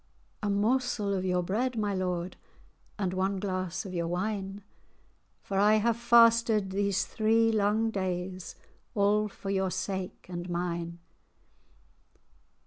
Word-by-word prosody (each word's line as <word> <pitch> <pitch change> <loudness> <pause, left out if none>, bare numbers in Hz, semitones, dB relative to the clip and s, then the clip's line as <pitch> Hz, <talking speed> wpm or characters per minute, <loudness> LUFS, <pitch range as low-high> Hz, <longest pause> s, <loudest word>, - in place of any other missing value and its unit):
"A 210 - -1
morsel 210 0 +1
of 185 -1 -1
your 180 -1 +1
bread, 235 +7 -1
my 205 -2 0
lord, 180 -1 -2 0.6
And 190 -4 -1
one 190 +1 0
glass 185 -1 -3
of 190 - -7
your 170 -1 -1
wine; 195 +2 -3 0.8
For 195 -1 -1
I 210 +2 +5
have 225 +2 +2
fasted 230 -3 +4
these 200 0 +1
three 225 +1 +2
lang 215 +1 +2
days, 185 -2 -3 0.4
All 210 +1 +3
for 195 -1 -6
your 190 -1 +1
sake 190 0 -4
and 175 0 -6
mine. 170 -1 -3
195 Hz, 130 wpm, -29 LUFS, 185-215 Hz, 0.8 s, I